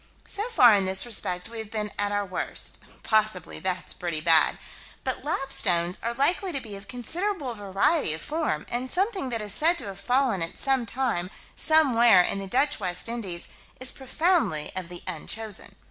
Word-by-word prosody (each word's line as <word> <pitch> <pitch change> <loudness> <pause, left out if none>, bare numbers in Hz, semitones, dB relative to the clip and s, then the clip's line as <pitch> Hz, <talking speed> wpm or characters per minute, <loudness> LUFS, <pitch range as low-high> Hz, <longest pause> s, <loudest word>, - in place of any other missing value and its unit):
So 420 +4 -2
far, 245 - +6
in 200 -2 +2
this 190 +2 +1
respect, 180 -6 0
we 230 0 -8
have 220 -2 -7
been 210 -2 -3
at 205 0 +1
our 205 0 -1
worst 185 - -2 0.2
possibly 215 -4 0
that's 185 -1 -3
pretty 170 -3 -3
bad 160 0 +4 0.5
but 260 -1 -3
"lapstones" 185 - +1
are 235 +1 -3
likely 350 +8 +3
to 280 - -1
be 220 -5 -8
of 195 0 -11
considerable 300 - -3
variety 200 - +1
of 160 - -7
form, 300 - -2
and 250 +2 0
something 380 - -1
that 230 -3 -3
is 205 -2 0
said 335 +3 +3
to - - -6
have 195 -1 -7
fallen 250 -5 +1
at 165 - -1
sometime 250 -7 0 0.3
somewhere 240 - +5
in 195 - 0
the 195 - -5
Dutch 285 +7 +1
West 180 -1 -1
Indies 205 -8 -4 0.3
is 255 0 0
profoundly 270 - 0
of 185 -2 -4
the 175 -1 -7
unchosen. 215 +6 -2
225 Hz, 175 wpm, -26 LUFS, 190-270 Hz, 0.5 s, far